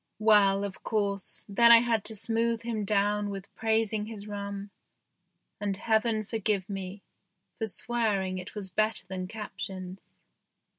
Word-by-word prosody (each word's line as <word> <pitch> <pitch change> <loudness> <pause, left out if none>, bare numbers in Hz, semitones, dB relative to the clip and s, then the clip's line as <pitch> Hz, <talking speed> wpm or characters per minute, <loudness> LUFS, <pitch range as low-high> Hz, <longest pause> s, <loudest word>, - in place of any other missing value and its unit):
Well, 205 -2 +5
of 200 -2 -5
course, 200 -3 -2
then 235 +4 +6
I 230 -1 +10
had 230 -3 +1
to 220 - +4
smooth 230 +2 0
him 225 -3 -2
down 205 0 +1
with 195 -1 -7
praising 220 -1 0
his 215 -2 -8
rum, 200 -1 -5 0.9
and 200 -2 -1
Heaven 220 0 +1
for 225 +2 -3
give 200 -2 0
me 195 0 -6 0.6
for 220 - -1
swearing 205 -4 -1
it 185 +4 -9
was 195 -3 -4
better 215 +1 +1
than 185 -1 -5
Captain's. 190 -3 -7
205 Hz, 145 wpm, -29 LUFS, 195-220 Hz, 0.9 s, I